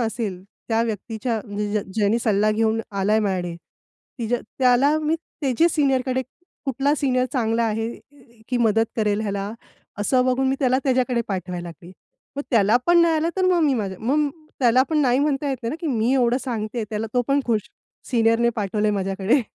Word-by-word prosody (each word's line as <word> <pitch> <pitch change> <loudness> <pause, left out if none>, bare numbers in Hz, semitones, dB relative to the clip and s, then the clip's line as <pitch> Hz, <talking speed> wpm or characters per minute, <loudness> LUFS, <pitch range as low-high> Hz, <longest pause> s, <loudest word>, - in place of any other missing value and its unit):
असेल 220 -5 -3 0.3
त्या 225 0 +2
व्यक्तीच्या 225 +1 -3
म्हणजे 205 0 -3
ज 210 - +2 0.2
ज्याने 215 +1 +2
सल्ला 215 -2 +2
घेऊन 220 +1 +1 0.2
आलाय 205 +3 +2
माझ्याकडे, 185 -4 -1 0.6
तिच्या 235 +1 -1 0.2
त्याला 265 +4 +4
मी 310 +1 0
त्याची 310 -1 0
सीनियरकडे, 260 -3 +1 0.4
कुठला 275 +2 +1
सीनियर 255 -4 +1
चांगला 230 -3 +1
आहे 225 +1 -1 0.6
की 250 - 0
अ, - - 0
मदत 225 0 +3
करेल 210 -1 +1
ह्याला, 200 0 -3 0.5
असं 250 +5 +2
बघून 260 +1 +2
मी 270 - +1
त्याला 260 0 +3
त्याच्याकडे 255 -2 +1
पाठवायला 180 -2 -4
लागले. 170 +2 -12 0.4
मग 285 - -2
त्याला 220 -2 +4
पण 345 0 +5
नाही 335 -1 +4
आलं, 315 +1 +1
तर 375 - +1
मग 360 -2 +3
मी 285 -4 +3
माझ्या 195 -5 -3
मग 290 +6 +1 0.3
त्याला 250 +1 +5
पण 310 - +2
नाही 255 -3 +3
म्हणता 285 0 0
येत 265 - -1
नाही 230 - -2
ना, - - -4
की 340 - -3
मी 225 +3 +2
एवढं 250 -1 +2
सांगतेय 225 -2 -3
त्याला, 215 +1 -2
तो 245 - +3
पण 280 +1 +3
खुश, 215 -3 0 0.4
सीनियरने 230 -1 +3
पाठवलंय 210 +1 0
माझ्याकडे 195 +5 +1
235 Hz, 180 wpm, -23 LUFS, 210-265 Hz, 0.6 s, पण